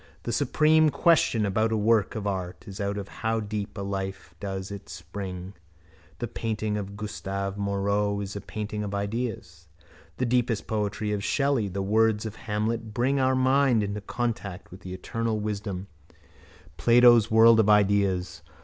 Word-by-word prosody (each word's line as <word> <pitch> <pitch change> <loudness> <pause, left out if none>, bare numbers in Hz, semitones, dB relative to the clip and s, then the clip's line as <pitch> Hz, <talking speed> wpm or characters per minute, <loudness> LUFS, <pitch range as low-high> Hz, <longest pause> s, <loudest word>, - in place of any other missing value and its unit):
The - - -3
supreme 155 0 +4
question 140 -6 +3
about 110 +3 +1
a 110 - +1
work 110 0 +2
of 110 -2 -4
art 95 -3 -4
is 100 +1 -7
out 100 0 -1
of 100 -1 -5
how 115 +2 -2
deep 105 -1 -4
a 100 - -3
life 95 -1 -5
does 95 -1 -5
it 100 -5 -8
spring. 90 +2 -7 0.6
The 120 - -3
painting 110 -2 -2
of 100 -1 -5
Gustave 100 -2 -4
Moreau 100 +1 0
is 100 -1 -5
the 100 - -5
painting 105 0 -5
of 100 -1 -4
ideas. 100 -5 -4 0.5
The - - 0
deepest 120 -2 +1
poetry 105 0 -2
of 105 -1 -2
Shelley, 140 -6 +1
the 100 +1 -3
words 110 +1 +2
of 110 -1 -5
Hamlet 110 +1 -3
bring 135 +3 +1
our 130 0 +3
minds 130 -3 +3
into 100 +1 -4
contact 105 -4 -4
with 90 - -10
the 95 -1 -7
eternal 115 +3 -2
wisdom, 100 -3 -4 0.9
Plato's 120 -2 +6
world 110 +1 +7
of 105 -1 +4
ideas. 100 -4 +2
105 Hz, 160 wpm, -26 LUFS, 100-115 Hz, 0.9 s, world